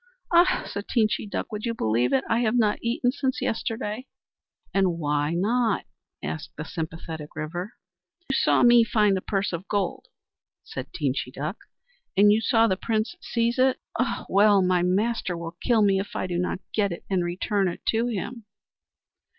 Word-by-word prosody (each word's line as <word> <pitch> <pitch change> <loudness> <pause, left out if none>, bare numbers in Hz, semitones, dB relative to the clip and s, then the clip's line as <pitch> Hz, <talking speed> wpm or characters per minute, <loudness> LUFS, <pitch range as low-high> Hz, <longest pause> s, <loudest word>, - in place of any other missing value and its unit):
"Ah!" 345 +2 +5
said 200 +1 -5
Teenchy 215 -2 +1
Duck, 190 - -4
"would 210 0 -5
you 230 -1 -1
believe 120 - +1
it? 135 -1 +2
I 230 - +2
have 235 -1 +1
not 215 -3 +2
eaten 240 +1 +1
since 265 -1 -1
yesterday." 225 +2 -3 0.7
"And 190 -3 +2
why 150 0 0
not?" 220 +3 +1 0.4
asked 80 +1 -5
the 150 - -5
sympathetic 160 -1 -6
River. 175 +7 -4 0.5
"You - - -1
saw - - +3
me 240 -1 +7
find 210 -2 +3
the 190 - -2
purse 195 -1 -1
of 170 +3 -5
gold," 200 -4 -2 0.6
said - - -7
Teenchy 130 -2 -2
Duck, 155 - -4 0.6
"and 205 +1 +7
you 215 +2 +3
saw 225 -1 +4
the 190 -4 +1
Prince 220 - -1
seize 235 +1 0
it. 260 0 +3 0.2
Ah, - - -1
well! 200 -1 +5
my 180 -1 +2
master 190 0 0
will 170 0 -6
kill 230 -4 +3
me 195 -1 +3
if 200 +1 -6
I - - -1
do 175 -1 -2
not 180 +1 -2
get 200 -3 +1
it 170 - -7
and 185 -3 +1
return 190 +3 0
it 175 - -5
to 230 +2 +1
him." 230 +1 -4
200 Hz, 175 wpm, -25 LUFS, 175-225 Hz, 0.7 s, me